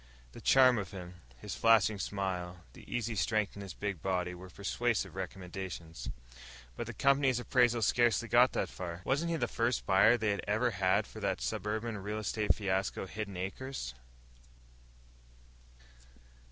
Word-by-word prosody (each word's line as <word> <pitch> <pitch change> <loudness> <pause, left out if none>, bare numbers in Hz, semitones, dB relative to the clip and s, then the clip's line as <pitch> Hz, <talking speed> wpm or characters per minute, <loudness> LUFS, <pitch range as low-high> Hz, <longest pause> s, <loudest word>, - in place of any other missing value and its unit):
The - - -11
charm 130 -3 +6
of 100 -3 -5
him, 90 -2 -9 0.2
his - - -6
flashing 110 -2 +4
smile, 90 -3 -3
the - - -14
easy 120 -1 -1
strength 110 0 0
in 100 - -7
his 100 -2 -8
big 100 -6 -4
body, 90 -1 -1
were 90 +1 -10
persuasive 115 +5 -1
recommendations. 90 -3 -6 0.7
But - - -5
the - - -5
Company's 135 -2 +3
appraisal 120 -2 +3
scarcely 120 0 +3
got 120 +2 +5
that - - 0
far. 85 -1 -6
Wasn't 150 +6 +1
he 165 - 0
the - - 0
first 115 +1 0
buyer 100 +5 +5
they 110 -2 +1
had 100 - -1
ever 110 +4 +2
had 95 -3 +2
for - - -10
that - - -1
suburban 110 +1 -2
real 105 +2 -4
estate 105 0 +1
fiasco, 95 -2 -1
Hidden 100 -1 -6
Acres...? 95 - -5
105 Hz, 155 wpm, -32 LUFS, 95-120 Hz, 0.7 s, charm